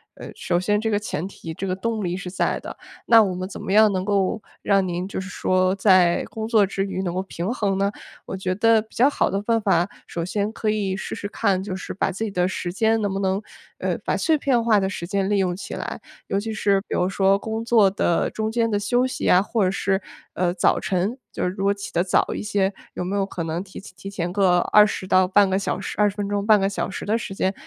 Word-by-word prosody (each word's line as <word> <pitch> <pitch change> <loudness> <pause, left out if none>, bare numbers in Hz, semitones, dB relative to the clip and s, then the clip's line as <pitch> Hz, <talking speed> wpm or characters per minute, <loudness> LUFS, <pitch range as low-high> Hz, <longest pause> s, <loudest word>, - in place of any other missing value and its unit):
呃， - - -9
首 175 -1 0
先 205 +3 +1
这 225 - -1
个 205 - +2
前 185 -5 -4
提、 165 -4 -8
这 190 - -5
个 185 -1 -1
动 220 +2 -2
力 175 -1 -1
是 190 -1 -6
在 185 - -1
的。 - - -9 0.3
那 230 -2 +7
我 190 -3 -1
们 185 +1 -4
怎 195 - -9
么 - - -4
样 215 +1 +6
能 185 -1 -1
够 200 +1 0 0.2
让 195 -2 +2
您 180 +1 -3
就 195 - -4
是 190 - -8
说 185 -1 +1
在 185 -3 +4
工 220 0 -5
作 220 -3 +4
之 195 0 -2
余 195 -1 -3
能 180 -2 -2
够 185 - -1
平 190 +1 -4
衡 200 -5 0
呢？ 200 +1 +1 0.3
我 - - -5
觉 185 -1 -1
得 225 +2 +4
比 220 - -28
较 255 +4 +5
好 - - +1
的 195 - -1
办 230 +2 +1
法， 190 -3 +2 0.2
首 170 - -4
先 205 +3 -1
可 220 -1 -2
以 205 -3 0
试 - - -5
试 205 - -5
看， 195 -4 0
就 195 -2 -4
是 190 - -7
把 190 - -1
自 195 +4 -4
己 220 - -2
的 180 -2 +1
时 180 -1 -3
间 220 +3 +2
能 205 -2 0
不 195 - -2
能 190 0 0 0.4
呃， - - -1
把 - - +1
碎 320 -3 +2
片 265 -4 +1
化 220 -3 +4
的 190 -1 0
时 170 -3 -5
间 195 0 0
利 205 - +2
用 180 -2 0
起 190 - -7
来。 - - -5 0.3
尤 195 - 0
其 220 +2 -4
是 200 -2 +2
比 - - -5
如 180 - +1
说 195 0 +2
工 220 +1 -4
作 225 -4 +5
的 180 -3 +1
中 220 0 -3
间 230 0 +1
的 210 - +1
休 245 +5 +1
息 255 - -6
呀， 180 - +5
或 220 +1 0
者 185 - +2
是， 195 0 0 0.3
呃， 175 -1 0
早 180 - +2
晨。 190 +6 -1
就 - - -4
是 180 - +1
如 195 +1 -5
果 200 - +3
起 200 0 -6
得 175 - +2
早 180 - +1
一 - - -4
些， 200 -2 0 0.2
有 - - -3
没 190 +3 -2
有 200 - +1
可 185 -3 -4
能 165 +2 -3
提 190 -1 -10
前 190 - -13
提 195 +2 -8
前 175 -3 -3
个 190 -3 +3
20 210 +2 +3
到 185 0 +4
半 200 +2 +4
个 190 0 +1
小 200 - -2
时 - - -5
20 205 -1 +3
分 205 -1 -3
钟， 205 0 -1
半 215 -1 +5
个 195 - +1
小 200 - -3
时 195 - -6
的 215 - +1
时 220 -4 -4
间 190 0 0
195 Hz, 280 characters per minute, -23 LUFS, 185-210 Hz, 0.4 s, 那